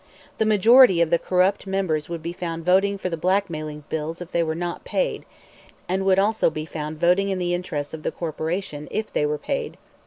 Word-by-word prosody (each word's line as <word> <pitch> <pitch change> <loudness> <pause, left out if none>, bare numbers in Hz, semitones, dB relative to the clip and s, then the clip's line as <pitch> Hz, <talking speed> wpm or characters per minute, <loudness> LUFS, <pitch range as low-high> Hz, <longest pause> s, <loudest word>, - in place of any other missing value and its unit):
The 220 - +2
majority 215 -1 +6
of 170 -2 +2
the 170 - +4
corrupt 185 +2 +1
members 185 -6 -1
would 170 -1 -5
be 170 +1 -4
found 165 -2 -5
voting 195 +2 +3
for 190 - -3
the 170 -2 -3
blackmailing 160 -4 -1
bills 160 +2 -4
if 175 -1 -8
they 170 - +1
were 160 -1 -1
not 175 +1 -4
paid, - - -2 0.6
and 190 +1 -1
would 190 -1 +4
also 210 +1 +3
be 155 -1 -5
found 155 0 -6
voting 180 +4 +3
in 190 - -1
the 175 -1 -1
interests 150 -5 -3
of 160 - -6
the - - -2
corporation 160 -1 -4
if 215 0 -3
they 150 - +1
were 150 0 -1
paid. 465 - -4
175 Hz, 210 wpm, -23 LUFS, 160-195 Hz, 0.6 s, majority